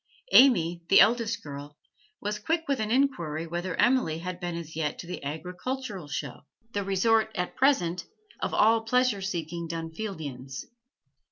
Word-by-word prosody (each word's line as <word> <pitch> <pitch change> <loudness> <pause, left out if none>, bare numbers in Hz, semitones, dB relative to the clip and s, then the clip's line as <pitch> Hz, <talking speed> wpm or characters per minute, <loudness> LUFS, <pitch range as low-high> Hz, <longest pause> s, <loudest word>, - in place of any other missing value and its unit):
Amy, 175 -10 +6
the - - +8
eldest 230 -2 +3
girl, 145 0 -8 0.4
was 210 +1 -3
quick 320 +9 0
with 275 -2 0
an 215 -1 -1
inquiry 195 - +1
whether 175 +1 -3
Emily 245 -11 +2
had 180 +1 -5
been 175 -2 -3
as 165 -2 -7
yet 155 -2 -1
to - - -8
the 180 -3 -6
Agricultural 180 - -5
Show, 145 -2 -5 0.3
the 205 -2 -1
resort 220 +3 +2
at 180 -2 -3
present 180 -11 +2 0.3
of - - -2
all 225 +1 +4
pleasure 250 -2 +2
seeking 170 -3 -3
Dunfieldians. 160 - -5
180 Hz, 150 wpm, -28 LUFS, 165-225 Hz, 0.4 s, the